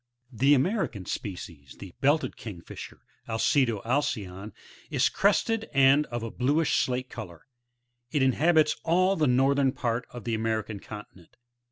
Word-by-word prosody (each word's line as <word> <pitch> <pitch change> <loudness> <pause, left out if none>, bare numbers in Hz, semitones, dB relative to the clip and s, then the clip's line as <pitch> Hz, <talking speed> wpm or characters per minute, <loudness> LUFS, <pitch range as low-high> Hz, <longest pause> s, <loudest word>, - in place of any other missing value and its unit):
The 135 +5 +4
American 140 - -1
species, 85 -10 -7
the 95 -3 -10
Belted 145 +3 +2
Kingfisher, 95 -7 -9
— - - -23
Alcedo 115 -1 +1
alcyon, 105 -6 -2 0.2
— - - -23
is - - +4
crested, 225 +3 +1
and 140 +2 +5
of 120 -1 -5
a 115 - -4
bluish 145 +5 +1
slate 125 0 -1
colour; 90 -8 -9 0.6
it 140 +1 +1
inhabits 155 +4 +3
all 185 +3 +2
the 155 -4 +2
northera 135 +2 +3
part 120 -1 -2
of 120 -3 -9
the 115 - -2
American 110 -1 -2
continent. 100 -5 -12
125 Hz, 145 wpm, -27 LUFS, 110-145 Hz, 0.6 s, and